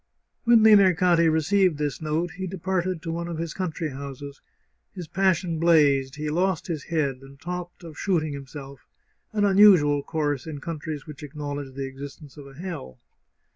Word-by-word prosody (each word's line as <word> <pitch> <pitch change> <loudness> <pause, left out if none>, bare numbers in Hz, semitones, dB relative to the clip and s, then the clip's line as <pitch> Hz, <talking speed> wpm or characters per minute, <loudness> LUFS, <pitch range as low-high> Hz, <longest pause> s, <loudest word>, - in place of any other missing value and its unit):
When 235 -2 +6
Limercati 180 -5 +5
received 175 +2 +2
this 150 0 -3
note 160 +3 -1
he 190 0 -5
departed 185 -1 -2
to 165 - -3
one 170 +1 -3
of 170 -2 -5
his 165 -1 -4
country 165 -4 -3
houses; 140 0 -8 0.5
his 175 -3 -7
passion 180 -2 +1
blazed, 145 -5 +3
he 150 0 -3
lost 180 +2 0
his 160 -5 -4
head, 150 -6 -1
and 135 0 -15
talked 175 +2 -6
of 160 -3 -10
shooting 160 -6 0
himself 140 0 -10 0.2
— - - -46
an 210 -1 +1
unusual 190 -8 +6
course 145 -2 -2
in 150 -3 -6
coun 165 +2 -5
tries 150 -2 -6
which 150 -3 -10
acknowledge 145 -2 -6
the 135 0 -3
existence 140 +1 -10
of 145 -2 -11
a 135 - -14
hell. 135 - -7
160 Hz, 175 wpm, -25 LUFS, 145-180 Hz, 0.5 s, When